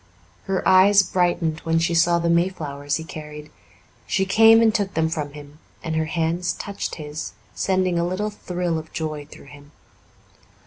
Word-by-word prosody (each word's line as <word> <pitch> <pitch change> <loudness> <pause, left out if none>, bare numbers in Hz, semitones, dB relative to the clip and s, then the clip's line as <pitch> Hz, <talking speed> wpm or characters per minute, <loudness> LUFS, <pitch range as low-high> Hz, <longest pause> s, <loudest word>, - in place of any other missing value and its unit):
Her 195 -2 -1
eyes 195 +2 +6
brightened 175 -4 0
when 165 0 0
she 170 +1 +1
saw 170 +1 +3
the 170 0 -1
mayflowers 155 -5 -1
he 160 - -4
carried. 150 -1 -9 0.6
She 190 0 +1
came 225 +3 +6
and 225 -1 +4
took 200 -2 -2
them 160 0 +1
from 150 -3 -4
him, 145 0 -12 0.2
and 160 -2 -3
her 160 0 0
hands 165 +2 -1
touched 200 -1 -5
his, 150 0 -7 0.2
sending 185 -2 0
a 170 - 0
little 205 +4 -2
thrill 180 -4 -3
of 160 0 -12
joy 155 -2 -4
through - - -14
him. 145 0 -15
170 Hz, 170 wpm, -22 LUFS, 155-185 Hz, 0.6 s, eyes